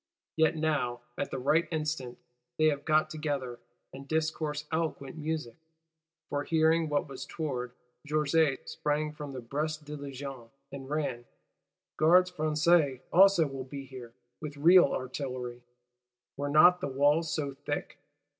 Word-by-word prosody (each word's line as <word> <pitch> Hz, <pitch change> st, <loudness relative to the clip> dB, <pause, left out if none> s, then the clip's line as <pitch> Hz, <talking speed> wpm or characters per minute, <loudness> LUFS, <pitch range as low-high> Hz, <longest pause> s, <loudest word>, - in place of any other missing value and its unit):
Yet 160 Hz, 0 st, +3 dB
now, 145 Hz, -6 st, -1 dB
at -, -, -3 dB
the -, -, -4 dB
right 150 Hz, +6 st, +2 dB
instant, 155 Hz, -6 st, -3 dB, 0.4 s
they 155 Hz, 0 st, +5 dB
have 145 Hz, -1 st, -3 dB
got 155 Hz, 0 st, +2 dB
together, 140 Hz, -6 st, -3 dB, 0.3 s
and 135 Hz, +1 st, -10 dB
discourse 155 Hz, -1 st, -1 dB
eloquent 160 Hz, -4 st, -2 dB
music. 155 Hz, -6 st, -4 dB, 0.7 s
For, 145 Hz, 0 st, -2 dB
hearing 160 Hz, 0 st, +2 dB
what 145 Hz, 0 st, 0 dB
was 135 Hz, -2 st, -7 dB
toward, 125 Hz, -6 st, -4 dB, 0.3 s
Georget 150 Hz, -1 st, +1 dB
sprang 150 Hz, +1 st, -1 dB
from 150 Hz, -2 st, -7 dB
the 130 Hz, -, -6 dB
Brest 150 Hz, +5 st, -3 dB
Diligence, 140 Hz, -4 st, -7 dB, 0.2 s
and 135 Hz, -1 st, -8 dB
ran. 140 Hz, -6 st, -2 dB, 0.7 s
Gardes 180 Hz, +3 st, +5 dB
Françaises 155 Hz, -4 st, +2 dB
also 190 Hz, -2 st, +6 dB
will 135 Hz, -2 st, -5 dB
be 135 Hz, +1 st, -8 dB
here, 125 Hz, -3 st, -11 dB, 0.3 s
with 150 Hz, -1 st, -6 dB
real 175 Hz, +5 st, +7 dB
artillery: 125 Hz, -2 st, -4 dB, 0.7 s
were 145 Hz, +1 st, -3 dB
not 175 Hz, +5 st, +6 dB
the -, -, -1 dB
walls 145 Hz, +4 st, +2 dB
so 145 Hz, -3 st, -2 dB
thick! 145 Hz, +2 st, -5 dB
150 Hz, 135 wpm, -30 LUFS, 135-155 Hz, 0.7 s, real